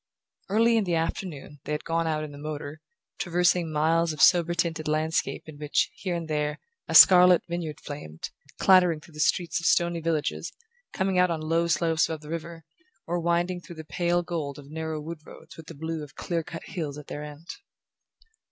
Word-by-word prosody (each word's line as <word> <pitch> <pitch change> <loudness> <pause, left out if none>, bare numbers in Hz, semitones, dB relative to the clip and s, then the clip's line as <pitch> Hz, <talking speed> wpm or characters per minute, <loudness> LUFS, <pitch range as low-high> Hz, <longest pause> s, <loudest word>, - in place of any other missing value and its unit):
Early 230 +3 +4
in 215 - +1
the 175 -2 0
afternoon 160 -3 -4
they 150 - -2
had 150 - -3
gone 165 0 -1
out 155 -1 -1
in 150 - -7
the 145 - -11
motor, 150 0 -6 0.4
traversing 175 -1 +1
miles 160 +2 +2
of 155 - -8
sober 175 -1 +5
tinted 165 -2 -1
landscape 155 +1 -1
in 150 -2 -11
which, 150 -1 0
here 180 -3 -4
and 170 -1 -4
there, 150 0 -1 0.3
a - - -2
scarlet 180 -1 +9
vineyard 170 -3 -4
flamed, 80 - -8 0.3
clattering 180 -4 +5
through 155 +1 -17
the 150 - -11
streets 170 +2 +1
of 170 - -1
stony 170 -1 +2
villages, 160 -2 -2 0.4
coming 190 -1 0
out 180 0 +4
on 165 -2 -1
low 165 +2 +1
slopes 165 -1 +2
above 160 -2 -4
the 150 - -12
river, 165 0 -6 0.4
or 175 +1 -1
winding 175 +1 0
through 170 - -11
the 160 -1 -9
pale 175 +3 0
gold 155 -5 -4
of 145 0 -12
narrow 160 0 -4
wood 160 +2 -7
roads - - -14
with 160 -1 -12
the 165 - -9
blue 160 +2 -4
of 145 - -12
clear 170 -2 -2
cut 165 +1 -8
hills 150 -5 -5
at 150 - -9
their 150 - -6
end. 150 +3 -10
165 Hz, 200 wpm, -26 LUFS, 155-175 Hz, 0.4 s, scarlet